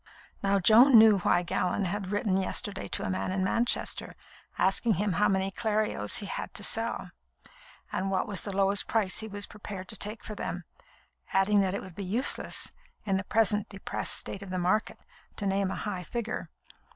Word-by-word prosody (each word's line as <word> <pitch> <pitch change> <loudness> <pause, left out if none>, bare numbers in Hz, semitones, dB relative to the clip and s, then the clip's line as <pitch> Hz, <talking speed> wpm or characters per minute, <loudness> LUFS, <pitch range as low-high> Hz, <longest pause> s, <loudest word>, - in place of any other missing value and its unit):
Now 200 0 +2
Joan 230 +7 +7
knew 220 -2 +7
why 175 0 +2
Gallon 180 +3 -1
had 195 +1 -3
written 205 -2 0
yesterday 195 - -1
to - - -2
a - - -2
man 95 - -2
in 190 0 0
Manchester, 230 +5 0 0.4
asking 205 +4 +2
him 200 +2 0
how 210 +5 +3
many 190 0 0
Clerios 210 - 0
he - - 0
had - - -5
to - - -2
sell, - - -1 0.8
and 195 +1 -1
what 190 -1 0
was 200 -5 -1
the 205 - -5
lowest 200 +1 +3
price 210 -5 +1
he 220 - -4
was 205 -1 -3
prepared 200 -2 -8
to - - +2
take 210 +2 -1
for 215 - -6
them, - - -5 0.7
adding 200 +2 +4
that 190 0 0
it - - -4
would 185 - -10
be 200 - -6
useless, 220 +9 0 0.3
in 195 -2 +1
the 190 - -2
present 210 -1 +2
depressed 195 -1 -3
state 195 - -4
of 200 - -8
the 185 - -3
market, 185 +5 0 0.4
to 205 - -4
name 195 0 +1
a - - -3
high 195 -4 -4
figure. 235 +4 -4
200 Hz, 190 wpm, -29 LUFS, 190-210 Hz, 0.8 s, Joan